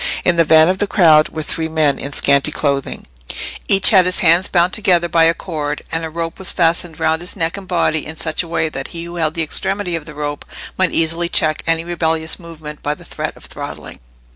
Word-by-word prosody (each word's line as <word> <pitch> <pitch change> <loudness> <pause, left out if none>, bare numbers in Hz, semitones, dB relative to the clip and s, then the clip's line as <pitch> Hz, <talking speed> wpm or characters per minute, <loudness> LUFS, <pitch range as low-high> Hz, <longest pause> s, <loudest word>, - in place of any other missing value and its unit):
In 175 - +4
the 170 - +4
van 160 0 +5
of 185 +1 0
the 205 - 0
crowd 160 -7 +5
were 155 - -5
three 160 +1 -3
men 155 -3 +1
in 140 - -6
scanty 140 +1 +2
clothing; 140 -2 -2 0.6
each 195 -1 +5
had 190 -4 +6
his 180 - +2
hands 175 +2 +4
bound 175 0 +2
together 180 -5 +2
by 165 -1 +3
a 165 +1 +3
cord, 150 -5 -4
and 165 0 -2
a 160 - -4
rope 165 +2 -5
was 190 - 0
fastened 165 -2 0
round 160 +1 +1
his 175 - -6
neck 165 -3 -2
and 200 -2 -9
body, 165 -4 +1
in 160 +1 -6
such 155 0 -1
a 175 - -8
way 165 -1 -1
that 135 -3 -5
he 165 0 -7
who 170 0 -8
held 160 -2 -1
the 165 - 0
extremity 190 +3 -1
of 160 -2 -5
the 150 - -10
rope 145 0 -4 0.3
might 185 -1 +2
easily 165 +1 0
check 155 -3 +2
any 165 0 +1
rebellious 160 -2 -2
movement 155 -3 -10
by 150 0 -2
the - - -15
threat - - -5
of - - -13
throttling. - - -8
165 Hz, 230 wpm, -17 LUFS, 155-175 Hz, 0.6 s, had